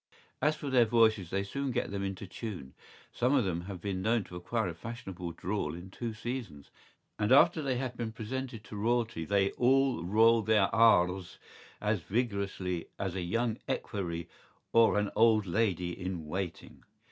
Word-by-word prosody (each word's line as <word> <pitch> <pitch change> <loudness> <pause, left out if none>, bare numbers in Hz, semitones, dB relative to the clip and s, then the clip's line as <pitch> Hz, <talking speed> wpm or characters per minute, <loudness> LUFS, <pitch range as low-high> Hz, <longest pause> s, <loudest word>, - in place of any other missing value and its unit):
¬Ý - - +3
As 155 - +2
for 140 - -5
their 125 -3 +5
voices 110 -5 +3
they 100 +2 -1
soon 140 +7 -3
get 125 - -1
them 100 -1 -3
into 95 0 -4
tune.¬Ý 95 - -7 0.4
Some 125 +4 +2
of 130 -6 +3
them 85 -2 -1
have 95 -2 -6
been 95 0 -3
known 115 +1 +2
to 90 - -12
acquire 110 +5 -1
a - - -5
fashionable 95 -3 -7
drawl 90 -5 -3
in 90 +2 -10
two 115 +3 -4
seasons; 110 - -6 0.5
and 105 +2 +1
after 160 +4 +6
they 135 -3 -1
have 125 -1 -3
been 115 -2 -3
presented 115 +1 -5
to 110 - -10
Royalty 115 -4 0
they 100 +2 +2
all 135 -4 +2
roll 110 +5 +5
their 105 -2 +2
R’s 95 -5 +4 0.4
as 105 -1 0
vigorously 100 -4 -2
as 95 -3 -2
a 95 - -3
young 115 +6 -1
equerry 85 -6 -3 0.5
or 115 -2 +5
an 105 0 0
old 110 -2 +5
lady 90 -2 0
in 90 -2 -5
waiting. 90 +3 -5
105 Hz, 175 wpm, -31 LUFS, 95-120 Hz, 0.5 s, after